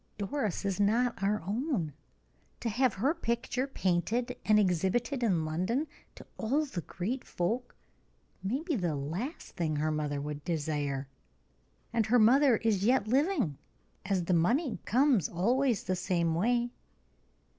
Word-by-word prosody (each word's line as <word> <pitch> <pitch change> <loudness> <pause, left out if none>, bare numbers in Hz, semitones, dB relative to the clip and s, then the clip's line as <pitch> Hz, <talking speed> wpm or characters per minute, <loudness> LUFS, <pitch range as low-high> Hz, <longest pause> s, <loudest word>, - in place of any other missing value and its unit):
Doris 210 - -2
is 195 0 -1
not 230 +4 +2
our 205 0 +1
own. 210 - -1 0.7
To 235 - -1
have 245 +1 +2
her 260 +11 +1
picture 250 -3 -2
painted 235 +3 0
and 215 -1 +4
exhibited 205 - +1
in 180 -9 +2
London 185 - 0 0.3
to - - -12
all 275 +8 +1
the 205 -11 -5
great 220 +11 -4
folk, 230 +8 -2 0.7
may 240 - -2
be 335 -3 -1
the 175 -8 -1
last 170 - -5
thing 160 -4 -1
her 155 +1 0
mother 150 -2 -1
would 145 0 -5
desire: 145 -4 -2 0.9
and 225 -2 +1
her 245 +3 +4
mother 250 +2 +6
is 210 -4 +1
yet 235 -1 +3
living, 265 - +1 0.4
as 190 -2 0
the 180 - 0
money 230 - +2
comes 250 - +3
always 235 +6 +1
the 185 - -1
same 175 -3 0
way." 240 +7 +1
210 Hz, 145 wpm, -30 LUFS, 175-245 Hz, 0.9 s, mother